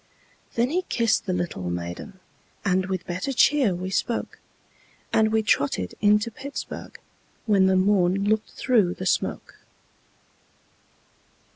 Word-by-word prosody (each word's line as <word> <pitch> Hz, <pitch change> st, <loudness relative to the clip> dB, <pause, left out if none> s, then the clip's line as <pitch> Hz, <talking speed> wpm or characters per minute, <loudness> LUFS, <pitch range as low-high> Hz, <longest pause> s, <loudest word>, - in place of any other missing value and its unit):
Then 240 Hz, +3 st, +1 dB
he 360 Hz, +3 st, +1 dB
kissed 230 Hz, -4 st, +1 dB
the -, -, 0 dB
little 175 Hz, -, -3 dB
maiden, 85 Hz, -, -6 dB, 0.5 s
And 185 Hz, -1 st, +1 dB
with 185 Hz, -2 st, -3 dB
better 185 Hz, +10 st, -3 dB
cheer 265 Hz, -6 st, +3 dB
we 185 Hz, +2 st, -5 dB
spoke, 230 Hz, +4 st, -2 dB, 0.7 s
And 220 Hz, 0 st, +3 dB
we 220 Hz, 0 st, +2 dB
trotted 140 Hz, -, 0 dB
into 210 Hz, +2 st, +3 dB
Pittsburg, 280 Hz, +5 st, -7 dB, 0.5 s
When 200 Hz, -4 st, +4 dB
the 190 Hz, -, +3 dB
morn 190 Hz, 0 st, +2 dB
looked 215 Hz, 0 st, +1 dB
through 215 Hz, -9 st, +1 dB
the 185 Hz, -, -6 dB
smoke. -, -, -1 dB
195 Hz, 125 wpm, -25 LUFS, 180-220 Hz, 0.7 s, When